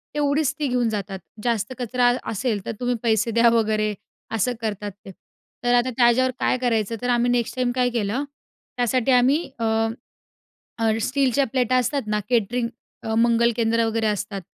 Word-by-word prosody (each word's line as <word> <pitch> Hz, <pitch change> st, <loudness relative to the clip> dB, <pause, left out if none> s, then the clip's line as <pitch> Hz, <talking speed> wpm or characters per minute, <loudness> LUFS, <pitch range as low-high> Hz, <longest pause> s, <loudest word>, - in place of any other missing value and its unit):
तेवढीच 290 Hz, -1 st, +1 dB
ती 290 Hz, -, 0 dB
घेऊन 245 Hz, -2 st, +1 dB
जातात. 200 Hz, -2 st, -4 dB, 0.2 s
जास्त 230 Hz, 0 st, -1 dB
कचरा 245 Hz, +1 st, +1 dB
अ 245 Hz, -, +1 dB
असेल 215 Hz, -2 st, -2 dB
तर -, -, -2 dB
तुम्ही 245 Hz, 0 st, 0 dB
पैसे 225 Hz, 0 st, +2 dB
द्या 235 Hz, +1 st, +5 dB
वगैरे 215 Hz, -2 st, +1 dB, 0.4 s
असं 225 Hz, +4 st, +1 dB
करतात 205 Hz, -2 st, -3 dB
ते. 195 Hz, -, -8 dB, 0.5 s
तर 245 Hz, 0 st, +2 dB
आता 245 Hz, +1 st, +3 dB
त्याच्यावर 255 Hz, +1 st, +4 dB
काय -, -, +1 dB
करायचं? 230 Hz, -3 st, 0 dB
तर 245 Hz, -, -2 dB
आम्ही 245 Hz, 0 st, +2 dB
नेक्स्ट 235 Hz, -1 st, 0 dB
टाईम 250 Hz, -1 st, 0 dB
काय 250 Hz, -1 st, +2 dB
केलं, 235 Hz, +3 st, -1 dB, 0.5 s
त्यासाठी 245 Hz, +1 st, +1 dB
आम्ही 260 Hz, +6 st, +3 dB
अ, 225 Hz, -, -1 dB, 1.1 s
अ, 225 Hz, -1 st, +2 dB
स्टीलच्या 275 Hz, +2 st, +1 dB
प्लेटा 255 Hz, -1 st, +2 dB
असतात 275 Hz, +3 st, 0 dB
ना 210 Hz, 0 st, 0 dB
केटरिंग 235 Hz, 0 st, +1 dB, 0.3 s
अ, 220 Hz, -, -2 dB
मंगल 235 Hz, +1 st, +3 dB
केंद्र 230 Hz, 0 st, +2 dB
वगैरे 225 Hz, 0 st, 0 dB
असतात. 205 Hz, -1 st, -2 dB
235 Hz, 170 wpm, -23 LUFS, 220-250 Hz, 1.1 s, द्या